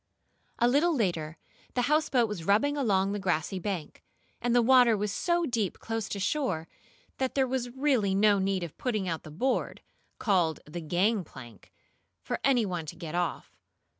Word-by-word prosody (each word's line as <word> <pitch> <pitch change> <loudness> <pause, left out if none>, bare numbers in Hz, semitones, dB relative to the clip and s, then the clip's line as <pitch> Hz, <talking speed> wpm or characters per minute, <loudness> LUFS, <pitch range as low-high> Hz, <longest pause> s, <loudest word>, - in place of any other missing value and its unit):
A 240 - +3
little 300 +7 +3
later 170 - -1 0.4
the 245 - +2
houseboat 285 -4 +2
was 210 -6 -5
rubbing 215 - +2
along 200 -8 +1
the 205 - -2
grassy 185 0 -1
bank, 180 -4 -5 0.4
and 240 0 +1
the 245 - +6
water 245 -2 +6
was 205 0 -2
so 345 - 0
deep 230 - -1
close 225 -1 -4
to 200 - -4
shore 190 - -1 0.5
that 260 -1 -1
there 270 -1 +3
was 255 -1 -2
really 250 -7 +1
no 205 0 +4
need 190 -1 0
of 170 - -7
putting 215 -7 -1
out 165 -2 -2
the - - -11
board, 245 - -1 0.4
called 175 - +1
the 170 +3 -7
"gangplank," 175 - -2 0.5
for - - -4
any 250 -5 +3
one 175 -5 -4
to - - -7
get 165 -3 -7
off. 175 -1 -3
205 Hz, 170 wpm, -29 LUFS, 175-250 Hz, 0.5 s, the